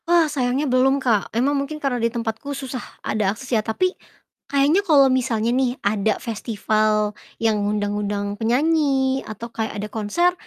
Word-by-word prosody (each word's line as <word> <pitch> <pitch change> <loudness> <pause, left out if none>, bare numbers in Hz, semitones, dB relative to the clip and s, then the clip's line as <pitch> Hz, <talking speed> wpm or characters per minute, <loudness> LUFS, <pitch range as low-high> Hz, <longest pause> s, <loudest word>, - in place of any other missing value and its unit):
Wah, 340 -1 +5
sayangnya 275 -1 0
belum, 265 +1 +3
Kak, 235 -7 +1
emang 255 +6 +1
mungkin 285 +2 -2
karena 270 -5 -1
di 230 - +2
tempatku 230 +4 -4
susah 260 -2 -5 0.2
ada 210 -2 +1
akses 260 +1 -7
ya 220 - +3
tapi 365 - 0 0.6
kayaknya 285 +7 +3
kalau 295 -8 +5
misalnya 235 -3 0
nih 255 0 +1
ada 205 0 +1
festival 215 -1 0 0.2
yang 220 -2 +1
ngundang-ngundang 205 0 -1
penyanyi 270 +1 +2
atau 225 +2 -8
kayak 220 -1 -3
ada 205 +1 -3
konser 230 +12 +1
245 Hz, 155 wpm, -22 LUFS, 215-275 Hz, 0.6 s, Wah